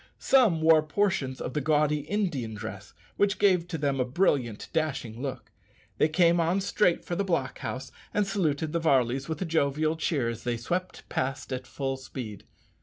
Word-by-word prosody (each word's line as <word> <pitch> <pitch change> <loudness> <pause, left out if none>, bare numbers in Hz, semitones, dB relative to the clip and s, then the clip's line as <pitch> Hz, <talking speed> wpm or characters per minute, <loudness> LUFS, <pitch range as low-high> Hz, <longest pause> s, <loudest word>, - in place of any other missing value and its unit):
Some 225 -12 +4
wore 160 -1 +7
portions 155 -5 0
of 125 - -4
the 150 - 0
gaudy 150 0 +2
Indian 145 - -2
dress, 100 -1 -8 0.2
which 205 0 +2
gave 185 -4 +3
to 170 - -3
them 140 -2 0
a - - +4
brilliant, 125 - 0
dashing 135 -8 -2
look. 135 -3 -5 0.5
They 155 - +4
came 170 +1 +4
on 170 +3 +2
straight 200 -2 +1
for 175 - -2
the 200 - 0
block 165 -9 -1
house, 130 +2 -5 0.2
and 210 0 +1
saluted 160 -6 -1
the 170 - 0
Varleys 135 -2 +2
with 160 +3 -2
a - - -3
jovial 155 -1 +1
cheer 155 -6 0
as 115 -1 -4
they 120 -1 -1
swept 180 +10 -4
past 135 +1 -2
at 125 0 -5
full 135 -1 -3
speed. 125 -6 -8
150 Hz, 180 wpm, -28 LUFS, 130-170 Hz, 0.5 s, wore